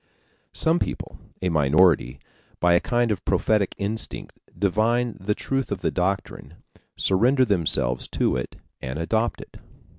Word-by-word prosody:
Some 165 +2 +4
people - - -5 0.2
a 90 - +1
minority 75 -3 +3 0.4
by 85 0 +4
a 85 - +5
kind 120 +1 0
of 100 - -3
prophetic 100 +1 +1
instinct 105 +3 -4 0.2
divine 115 +4 +1
the 105 +3 -1
truth 135 -3 -2
of 100 -2 -3
the - - 0
doctrine, 90 -5 -3 0.4
surrender 125 +8 +3
themselves 80 - 0
to - - 0
it 60 - -4 0.3
and 65 +2 -5
adopt 110 +8 -1
it. - - -13
95 Hz, 140 wpm, -24 LUFS, 85-115 Hz, 0.4 s, a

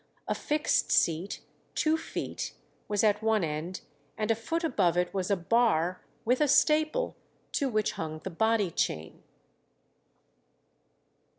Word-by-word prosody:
A - - +1
fixed 300 0 0
seat, 170 +4 +1 0.3
two 310 0 +3
feet, 320 - -4 0.3
was 205 0 +1
at 210 -1 +3
one 220 -3 +2
end, 160 +4 -3 0.4
and 215 0 0
a - - +3
foot 325 +10 -3
above 190 - +2
it 180 0 +1
was 190 -1 -1
a 200 - +4
bar 180 -3 +2 0.2
with 250 +5 +2
a 300 - +4
staple, 310 - +3 0.4
to 280 -3 0
which 215 -3 +1
hung 155 -1 -5
the 185 +4 -7
body 220 0 +2
chain. 80 - -2
210 Hz, 135 wpm, -29 LUFS, 175-250 Hz, 0.4 s, a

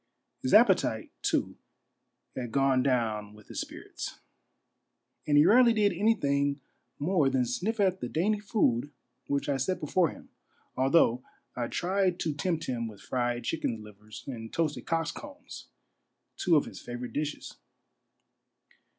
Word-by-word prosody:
His - - +3
appetite, - - +4
too, - - 0 0.8
had 120 -3 -4
gone 135 0 +3
down 110 -5 0
with 105 -1 -17
his - - -3
spirits; - - -7 1.1
and 145 -1 +4
he 145 - +7
rarely 235 +4 +6
did 210 -3 +3
anything 145 -8 +1 0.4
more 150 -2 +2
than 130 -2 +1
sniff 195 - -2
at 190 -2 +2
the 120 - -4
dainty 205 +6 +1
food 190 - +1 0.4
which 140 0 -1
I 140 -2 +1
set 175 +8 -1
before 165 +2 +2
him, - - -12 0.5
although 130 -2 +3 0.3
I 120 -1 -2
tried 185 +2 0
to 155 - 0
tempt 165 +2 -1
him 115 -2 -2
with 105 -3 -11
fried 120 +3 -2
chickens' 115 -9 -2
livers 105 +1 -12
and 115 -4 -7
toasted 150 -7 -1
cocks' 165 0 0
combs 290 - -10 0.3
— - - -51
two 175 -3 +4
of 150 - +3
Ids - - -9
favorite 120 0 -6
dishes. 150 0 -4
145 Hz, 145 wpm, -29 LUFS, 120-180 Hz, 1.1 s, he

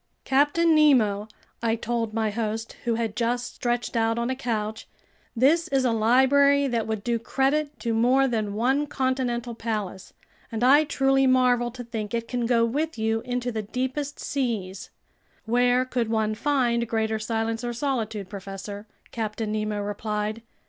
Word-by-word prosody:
"Captain 290 +5 +3
Nemo," 235 -10 +4 0.3
I 230 -1 +1
told 230 -1 -2
my 220 -1 0
host, 225 +1 -3
who 235 -1 +1
had 225 -2 -2
just 245 +2 -1
stretched 240 0 -2
out 225 0 +1
on 235 +2 -1
a - - -1
couch, 220 -4 -3 0.5
"this 310 +8 +3
is 270 -5 +1
a 245 - +3
library 265 +5 +4
that 235 -4 -1
would 220 -2 -3
do 235 -1 0
credit 280 +3 0
to 230 - -1
more 255 +4 +3
than 215 -4 -2
one 265 +6 +1
continental 255 -3 -1
palace, 210 -4 -4 0.4
and 225 +1 -2
I 285 +4 +6
truly 270 -1 +2
marvel 250 -2 +3
to 245 +1 -8
think 225 -2 -4
it 230 0 -3
can 245 -2 -2
go 230 -1 +3
with 300 +6 -2
you 225 0 0
into 245 0 -2
the 220 -1 -2
deepest 260 +6 -3
seas." 220 -9 -3 0.6
"Where 245 +2 +3
could 245 -3 -2
one 220 -1 +1
find 235 -2 +1
greater 220 -1 0
silence 225 +1 -2
or 240 - -2
solitude, 230 -6 -2
professor?" 200 +1 -8 0.2
Captain 220 -1 -3
Nemo 215 -1 -2
replied. 210 +1 -3
235 Hz, 160 wpm, -25 LUFS, 220-260 Hz, 0.6 s, I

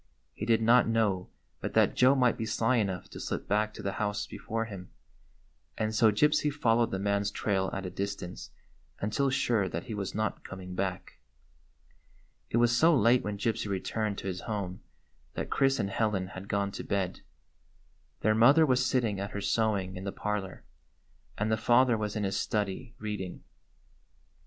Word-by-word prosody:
He 105 - -5
did 115 -1 +3
not 120 +3 +5
know 105 -5 +1 0.3
but - - -5
that - - +4
Joe 130 +2 +5
might 125 -3 +3
be 110 - -4
sly 115 +3 +1
enough 95 -5 -1
to - - -8
slip - - -4
back 105 +1 +1
to - - -8
the 100 - -1
house 105 0 -1
before 115 +1 -4
him, 95 -4 -9 0.9
and 110 0 -1
so 110 0 +5
Gypsy 150 +6 +3
followed 115 -5 +2
the 95 - -2
man's 100 +1 0
trail 95 -2 -1
at 95 - -4
a 90 - -4
distance 100 -2 -5 0.5
until 110 +7 0
sure 115 -7 +1
that - - -4
he 120 -4 -6
was 100 -2 -4
not 110 0 -2
coming 95 -1 -8
back. 95 0 -4 1.3
It - - 0
was 120 0 +4
so 160 +6 +5
late 120 0 +4
when 105 -1 -3
Gypsy 110 +1 -1
returned 100 +2 -2
to - - -5
his 95 -1 -3
home 100 -4 -4 0.5
that - - -4
Chris 135 0 +3
and 100 - -1
Helen 100 -4 0
had 95 0 -9
gone 100 -1 0
to - - -6
bed. 95 -2 -2 1.0
Their 110 - +3
mother 135 +9 +6
was 130 -3 +2
sitting 120 -6 +1
at 100 +1 -3
her 100 - -5
sewing 100 -4 0
in 95 - -6
the 100 - -3
parlor, 105 -3 -4 0.7
and 110 +2 0
the 110 - +2
father 120 +2 +4
was 105 -1 -3
in 105 - -1
his 95 0 -1
study 105 +2 -2
reading. 105 -4 -5
105 Hz, 180 wpm, -29 LUFS, 100-115 Hz, 1.3 s, mother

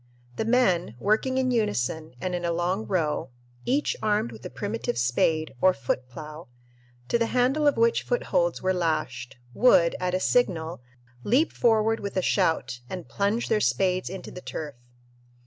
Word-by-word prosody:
The 220 - -1
men, 190 - +2
working 220 - +1
in 260 -1 +1
unison 160 - -1
and 180 +5 -3
in 175 0 -2
a 170 - 0
long 180 +5 -1
row, 155 -8 -1 0.4
each 280 +4 +1
armed 210 - +1
with 110 +1 -12
a - - -6
primitive 205 - -3
spade 155 +6 +1
or 185 0 +5
"foot 125 +2 -3
plough," 155 +4 -9 0.6
to 235 - +2
the 230 - +1
handle 260 +5 +2
of 290 - +3
which 465 0 +3
footholds - - 0
were 185 0 +2
lashed, 155 -8 -2 0.2
would, 170 - +4
at 180 0 -1
a - - +1
signal, 175 - 0 0.4
leap 275 +9 +2
forward 225 -1 +2
with 200 -1 -5
a 185 - +1
shout 125 -6 +1
and 180 -2 -6
plunge 205 +4 -1
their 215 -1 +1
spades 185 -3 +1
into 190 +1 -7
the 180 - -9
turf. 150 -4 -6
185 Hz, 165 wpm, -26 LUFS, 160-230 Hz, 0.6 s, or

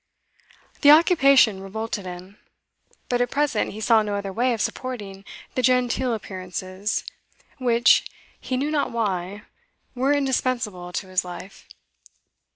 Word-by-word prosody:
The 285 - +6
occupation 275 - +6
revolted 205 0 -5
him, 180 +3 -10 0.7
but 245 -1 0
at 245 - +1
present 285 -6 0
he 215 - -8
saw 220 0 +4
no 205 -1 -2
other 200 -1 -4
way 245 +5 +1
of 230 - -2
supporting 205 -6 -4 0.3
the 255 - 0
genteel 250 0 +2
appearances 185 0 -4 0.6
which 240 -2 +4 0.3
he 255 - -3
knew 285 +4 -1
not 295 -2 0
why 205 -3 -3 0.5
were 265 +2 +1
indispensable 250 -9 -1
to 185 - -4
his 185 0 +1
life. 180 +2 -10
225 Hz, 130 wpm, -23 LUFS, 195-255 Hz, 0.7 s, The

